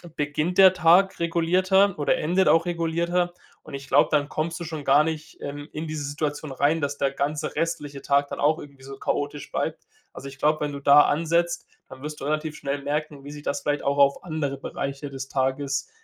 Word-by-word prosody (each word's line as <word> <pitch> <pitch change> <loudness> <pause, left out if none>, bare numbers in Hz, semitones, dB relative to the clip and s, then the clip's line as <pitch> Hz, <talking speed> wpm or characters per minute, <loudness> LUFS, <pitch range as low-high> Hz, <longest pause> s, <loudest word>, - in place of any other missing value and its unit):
beginnt 150 +4 -1
der 190 -1 +8
Tag 185 +2 +4
regulierter 185 +4 +2
oder 145 - +2
endet 180 +5 +1
auch 165 +1 +4
regulierter, 170 +1 -1 0.3
und 155 - -12
ich 135 -1 -7
glaube, 145 - +4
dann 145 -1 +1
kommst 165 +2 -2
du - - -5
schon 155 -2 -6
gar 150 - +5
nicht, 160 -1 -5
ähm, 145 +1 -6
in 155 +2 -4
diese 155 -1 -4
Situation 145 0 -3
rein, 145 +5 +2
dass 145 0 -2
der 140 -1 0
ganze 145 +2 -3
restliche 150 -4 -3
Tag 140 +1 +1
dann - - -6
auch 155 +2 +3
irgendwie 140 -2 -13
so 135 0 -9
chaotisch 145 +1 -3
bleibt. - - -3 0.3
Also, 140 - -9
ich 135 -1 -10
glaube, 155 +3 +2
wenn 145 -1 -2
du 140 - -5
da 140 +1 +7
ansetzt, 170 +3 0 0.2
dann 130 - -12
wirst 150 0 -6
du - - -4
relativ 155 +1 -2
schnell 140 0 -3
merken, 150 -1 -3
wie 145 - -9
sich 150 0 -9
das 140 - -2
vielleicht 145 0 -1
auch 140 0 0
auf 140 0 +3
andere 155 -5 -3
Bereiche 140 +1 -5
des 135 -1 -7
Tages 135 +1 -1
150 Hz, 210 wpm, -25 LUFS, 140-165 Hz, 0.3 s, der